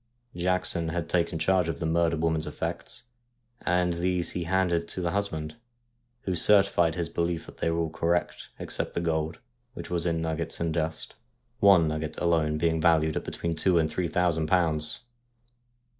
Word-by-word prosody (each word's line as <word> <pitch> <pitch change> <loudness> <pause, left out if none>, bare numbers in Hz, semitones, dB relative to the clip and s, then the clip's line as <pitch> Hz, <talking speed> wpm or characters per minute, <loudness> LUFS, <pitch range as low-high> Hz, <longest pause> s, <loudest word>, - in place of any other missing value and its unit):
Jackson 90 -1 0
had 85 -1 -3
taken 85 -2 0
charge 90 +2 +2
of 80 -4 -2
the 80 - -4
murdered 80 0 +1
woman's 80 -1 0
effects, - - -5 0.6
and 90 0 +1
these 90 +1 0
he 85 - -3
handed 85 -2 +1
to - - -5
the 85 -2 -1
husband, 80 -5 -3 0.6
who 95 - -2
certified 95 -3 +4
his 85 -2 -2
belief 85 0 -2
that - - -13
they - - 0
were 80 - -1
all 80 -1 -2
correct 85 +2 -1
except - - -3
the - - +1
gold, 80 -1 -1 0.4
which 85 0 -8
was 85 0 0
in 85 -1 0
nuggets 80 0 -3
and 85 -1 -1
dust, 80 -1 -3 0.5
one 95 -5 +6
nugget 80 0 -3
alone 80 -3 +1
being 80 0 +1
valued 80 -2 +3
at - - -2
between 85 -1 -3
two 90 +2 +2
and 80 -1 +1
three 90 +1 -1
thousand 85 -2 +1
pounds. 80 -2 +1
85 Hz, 175 wpm, -27 LUFS, 80-90 Hz, 0.6 s, one